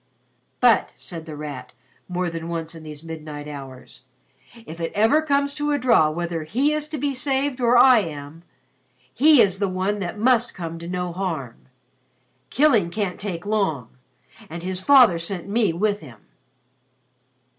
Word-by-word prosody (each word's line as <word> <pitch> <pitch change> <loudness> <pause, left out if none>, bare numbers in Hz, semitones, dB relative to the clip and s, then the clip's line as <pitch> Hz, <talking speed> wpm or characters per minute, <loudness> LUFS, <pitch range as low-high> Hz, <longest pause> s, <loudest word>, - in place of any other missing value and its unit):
"But," - - +4
said 165 -2 -9
The 155 - -7
Rat 145 -3 -8 0.3
more 180 0 -2
than 165 0 -5
once 165 -1 -4
in 165 - -11
these 155 -1 -10
midnight 155 -2 -8
hours, 135 -4 -10 0.6
"if 165 -2 -9
it 165 - -2
ever 225 +9 +4
comes 280 -2 0
to 295 0 -2
a - - +2
draw 230 - +4
whether 170 +1 -3
he 260 - 0
is 305 0 -2
to 305 0 -5
be 285 0 -1
saved 270 0 -1
or 240 0 +4
I 255 -1 +7
am, 155 -3 -7 0.7
he 295 +1 +6
is 190 -1 -1
the 200 -2 0
one 190 +3 -1
that 185 +1 -4
must 240 +2 +2
come 165 -2 -6
to 170 - -8
no 180 -1 -3
harm. 165 -10 -5 0.8
Killing 235 - +3
can't 195 -1 -3
take 185 -4 -5
long 190 - -1 0.6
and 170 +2 -7
his 185 0 -3
father 245 -8 +6
sent 175 +1 -4
me 210 -2 +1
with 205 +4 0
him." 120 - -14
185 Hz, 165 wpm, -23 LUFS, 165-240 Hz, 0.8 s, I